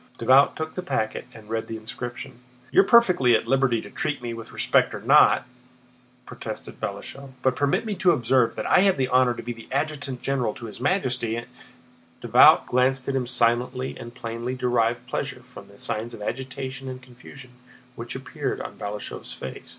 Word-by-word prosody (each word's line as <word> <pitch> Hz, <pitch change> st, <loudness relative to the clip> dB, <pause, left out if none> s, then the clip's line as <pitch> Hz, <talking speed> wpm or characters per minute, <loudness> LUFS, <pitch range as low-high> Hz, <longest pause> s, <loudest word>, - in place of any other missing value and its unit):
Davout 135 Hz, +2 st, +5 dB
took 160 Hz, 0 st, -4 dB
the 185 Hz, -, -4 dB
packet 110 Hz, -9 st, -2 dB
and 110 Hz, -3 st, -14 dB
read 115 Hz, 0 st, -3 dB
the 115 Hz, -, -5 dB
inscription. 120 Hz, +2 st, -7 dB, 0.3 s
"You -, -, +7 dB
are -, -, 0 dB
perfectly 180 Hz, -, +5 dB
at 110 Hz, -, 0 dB
liberty 130 Hz, -2 st, +2 dB
to -, -, -11 dB
treat 155 Hz, -6 st, -2 dB
me 120 Hz, -1 st, -5 dB
with 115 Hz, -1 st, -9 dB
respect -, -, +2 dB
or -, -, -5 dB
not," -, -, +5 dB, 0.8 s
protested -, -, -8 dB
Balashëv, 135 Hz, -1 st, -6 dB
"but 130 Hz, -1 st, +2 dB
permit 145 Hz, -, +1 dB
me 215 Hz, -, -2 dB
to 180 Hz, -, +4 dB
observe 125 Hz, -4 st, +2 dB
that -, -, -4 dB
I -, -, +5 dB
have 195 Hz, -2 st, +4 dB
the 130 Hz, -1 st, 0 dB
honor 125 Hz, -1 st, +3 dB
to -, -, -7 dB
be 115 Hz, -1 st, -7 dB
adjutant 140 Hz, -2 st, -2 dB
general 125 Hz, -6 st, -1 dB
to 115 Hz, -, -9 dB
His 110 Hz, +1 st, -9 dB
Majesty...." 125 Hz, -, 0 dB, 0.7 s
Davout -, -, +6 dB
glanced 130 Hz, +1 st, +1 dB
at 135 Hz, -, -1 dB
him 125 Hz, -2 st, -1 dB
silently 125 Hz, +1 st, +1 dB
and 120 Hz, +1 st, -10 dB
plainly 115 Hz, +1 st, -4 dB
derived 120 Hz, -1 st, 0 dB
pleasure 125 Hz, 0 st, -4 dB
from 125 Hz, 0 st, -13 dB
the 100 Hz, -, -17 dB
signs 110 Hz, +3 st, -4 dB
of -, -, -12 dB
agitation 130 Hz, +2 st, -5 dB
and 130 Hz, 0 st, -6 dB
confusion 125 Hz, +1 st, -13 dB, 0.4 s
which 115 Hz, +2 st, -7 dB
appeared 130 Hz, -, -4 dB
on -, -, -8 dB
Balashëv's 105 Hz, 0 st, -6 dB
face. 65 Hz, -, -8 dB
125 Hz, 180 wpm, -25 LUFS, 120-135 Hz, 0.8 s, You